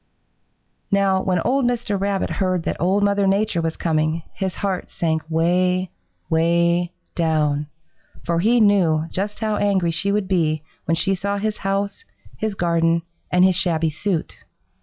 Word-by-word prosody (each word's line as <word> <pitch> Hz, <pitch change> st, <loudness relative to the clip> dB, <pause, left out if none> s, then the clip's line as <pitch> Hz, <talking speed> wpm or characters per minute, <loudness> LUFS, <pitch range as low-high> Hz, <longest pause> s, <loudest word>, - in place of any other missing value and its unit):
"Now 195 Hz, -1 st, +2 dB
when 185 Hz, -1 st, 0 dB
old 270 Hz, +6 st, +1 dB
Mr. 235 Hz, -5 st, -1 dB
Rabbit 200 Hz, -1 st, -1 dB
heard 185 Hz, -3 st, 0 dB
that -, -, -3 dB
Old 190 Hz, +4 st, +2 dB
Mother 200 Hz, -1 st, +2 dB
Nature 195 Hz, -2 st, +1 dB
was 165 Hz, -1 st, -2 dB
coming, 155 Hz, 0 st, 0 dB
his 190 Hz, -2 st, -3 dB
heart 195 Hz, -3 st, -3 dB
sank 160 Hz, -2 st, -1 dB
way, 180 Hz, +2 st, +1 dB, 0.4 s
way 170 Hz, +1 st, +2 dB, 0.2 s
down, 150 Hz, -3 st, 0 dB, 0.6 s
for 170 Hz, -1 st, 0 dB
he 230 Hz, +7 st, +3 dB
knew 180 Hz, -7 st, +3 dB
just 205 Hz, +3 st, -3 dB
how 215 Hz, -1 st, 0 dB
angry 190 Hz, -4 st, +1 dB
she 170 Hz, +5 st, -1 dB
would 205 Hz, -2 st, 0 dB
be 155 Hz, -5 st, +1 dB, 0.2 s
when 165 Hz, -, +1 dB
she 190 Hz, +4 st, +1 dB
saw 200 Hz, +2 st, -2 dB
his 215 Hz, +1 st, -2 dB
house, 200 Hz, -, -2 dB, 0.3 s
his 215 Hz, -2 st, -3 dB
garden 170 Hz, -1 st, +1 dB, 0.3 s
and 180 Hz, +1 st, +5 dB
his 190 Hz, -, +4 dB
shabby 165 Hz, -3 st, +1 dB
suit. 170 Hz, +2 st, -3 dB
185 Hz, 155 wpm, -21 LUFS, 165-200 Hz, 0.6 s, and